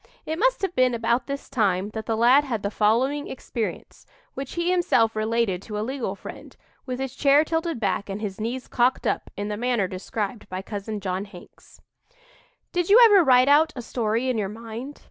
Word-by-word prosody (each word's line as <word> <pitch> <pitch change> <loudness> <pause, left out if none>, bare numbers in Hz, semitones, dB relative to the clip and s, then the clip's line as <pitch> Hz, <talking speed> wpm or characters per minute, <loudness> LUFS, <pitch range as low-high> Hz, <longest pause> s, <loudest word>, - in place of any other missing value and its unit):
It 315 +1 -3
must - - +2
have 380 -2 -1
been 255 -1 +3
about 235 +2 0
this 280 0 -5
time 205 -6 0
that 220 0 -6
the 225 - 0
lad 250 +5 +5
had 235 -7 -3
the 200 - -1
following 255 +8 +1
experience, 235 -3 -6 0.3
which 270 0 -6
he 345 +1 0
himself 235 -11 +2
related 215 -4 0
to 210 0 -6
a 210 - -2
legal 250 -6 -3
friend, - - -11 0.3
with 250 0 -4
his 265 -1 -4
chair 285 +1 +4
tilted 325 -3 -2
back 200 -1 -1
and 195 +1 -4
his 210 -1 -5
knees 245 +3 -4
"cocked 245 +2 +1
up" - - -1
in 205 +1 -3
the 210 - -3
manner 240 -4 0
described 200 +4 -5
by 185 +1 -5
Cousin 205 +1 -5
John 190 +1 -3
Hanks: 190 -4 -16 0.9
"Did 355 -1 -1
you 425 +4 +8
ever 405 -5 +6
write 255 -2 +5
out 305 +2 +4
a 245 - -6
story 230 +1 -1
in 250 -3 0
your 195 -2 -2
mind? 230 +6 -8
235 Hz, 200 wpm, -24 LUFS, 210-275 Hz, 0.9 s, you